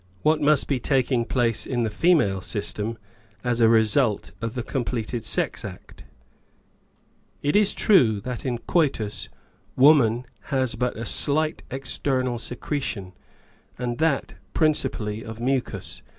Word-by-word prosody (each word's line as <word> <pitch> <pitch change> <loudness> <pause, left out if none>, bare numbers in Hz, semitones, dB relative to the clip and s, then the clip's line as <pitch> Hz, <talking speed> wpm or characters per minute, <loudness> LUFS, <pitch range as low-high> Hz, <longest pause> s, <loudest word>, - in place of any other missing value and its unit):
What 155 0 +3
must 150 0 +3
be 135 -3 0
taking 125 -1 +1
place 115 -3 0
in 120 -2 0
the 110 - -1
female 110 - +3
system 105 +2 -3 0.5
as 120 -1 0
a 115 - +6
result 110 0 +2
of 115 0 -3
the 125 - -2
completed 120 -3 -3
sex - - 0
act? - - -10 1.4
It 145 +4 +1
is 210 -1 +4
true 120 - +4
that 125 +2 -5
in 125 -3 -1
coitus 125 -6 -1 0.5
woman 130 -4 +5 0.2
has 130 -4 0
but 125 -2 -2
a 115 - -4
slight 155 +7 0
external 130 -2 -1
secretion, 120 -7 -4 0.6
and 120 -1 -3
that 160 -4 +1 0.2
principally 125 -9 0
of 110 0 -8
mucus. 130 +2 -2
125 Hz, 130 wpm, -24 LUFS, 115-140 Hz, 1.4 s, a